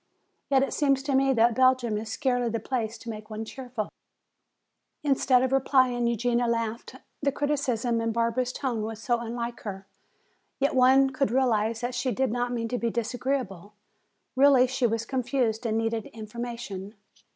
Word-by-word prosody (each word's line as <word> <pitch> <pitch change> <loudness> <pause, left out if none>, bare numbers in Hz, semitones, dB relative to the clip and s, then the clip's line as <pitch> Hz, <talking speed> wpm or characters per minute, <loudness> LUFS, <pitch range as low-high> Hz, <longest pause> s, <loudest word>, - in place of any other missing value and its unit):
Yet 270 -1 +4
it 275 - -2
seems 275 -2 +2
to 280 0 -1
me 270 0 +3
that 230 0 +4
Belgium 255 -2 +3
is 220 +1 -4
scarcely 245 -2 0
the 230 0 -2
place 225 -1 -3
to 230 - -15
make 215 0 -9
one 220 0 -5
cheerful." 245 -3 -5 1.1
Instead 270 -3 +3
of 260 - 0
replying 255 -3 +3
Eugenia 235 +1 +1
laughed. 230 +1 -2 0.3
The 280 -1 +2
cynicism 255 -5 0
in 230 0 0
Barbara's 235 +2 0
tone 250 -5 -2
was 220 0 -5
so 240 +1 0
unlike 235 +1 -4
her. 195 -2 -7 0.7
Yet 280 +1 +1
one 265 +1 +5
could 270 -1 0
realize 230 -3 +1
that 245 +1 -2
she 245 +2 -1
did 260 +2 0
not 245 +1 -1
mean 230 -2 -2
to 245 - -2
be 235 - 0
disagreeable. 235 -4 -3 0.6
Really 270 -1 +6
she 255 -1 0
was 225 0 -2
confused 250 -3 -1
and 220 0 0
needed 225 -1 -1
information. 220 -2 -7
240 Hz, 165 wpm, -27 LUFS, 225-260 Hz, 1.1 s, Really